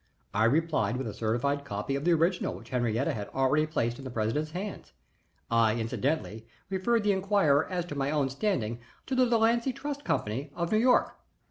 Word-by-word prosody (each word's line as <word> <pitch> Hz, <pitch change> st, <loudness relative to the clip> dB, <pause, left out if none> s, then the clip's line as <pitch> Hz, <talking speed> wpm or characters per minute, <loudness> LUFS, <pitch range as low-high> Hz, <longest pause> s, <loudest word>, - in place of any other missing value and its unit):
I 110 Hz, +2 st, +3 dB
replied 150 Hz, -1 st, +1 dB
with 135 Hz, -, -3 dB
a 110 Hz, -, -4 dB
certified 120 Hz, +6 st, -1 dB
copy 105 Hz, +2 st, -3 dB
of 140 Hz, +2 st, -3 dB
the 175 Hz, -, +5 dB
original 170 Hz, +3 st, +1 dB
which 115 Hz, -, -12 dB
Henriette 120 Hz, 0 st, 0 dB
had 105 Hz, -2 st, -3 dB
already 140 Hz, +4 st, +2 dB
placed 120 Hz, -6 st, -1 dB
in -, -, -8 dB
the 130 Hz, -, -5 dB
president's 120 Hz, +7 st, -1 dB
hands. 185 Hz, +5 st, -6 dB, 0.6 s
I 115 Hz, -1 st, +4 dB
incidentally 115 Hz, 0 st, -2 dB, 0.2 s
referred 215 Hz, +4 st, +1 dB
the 205 Hz, -, +3 dB
inquirer 190 Hz, -7 st, +2 dB
as 180 Hz, -2 st, -2 dB
to 150 Hz, -, -6 dB
my 140 Hz, 0 st, -1 dB
own 145 Hz, -3 st, +1 dB
standing 130 Hz, -, -1 dB, 0.3 s
to -, -, -4 dB
the 255 Hz, -1 st, +4 dB
Delancy 235 Hz, +2 st, +3 dB
Trust 285 Hz, +2 st, -5 dB
Company, 130 Hz, -, -2 dB
of 170 Hz, -1 st, -2 dB
New 215 Hz, -, +4 dB
York. 245 Hz, +2 st, +3 dB
145 Hz, 190 wpm, -29 LUFS, 120-190 Hz, 0.6 s, the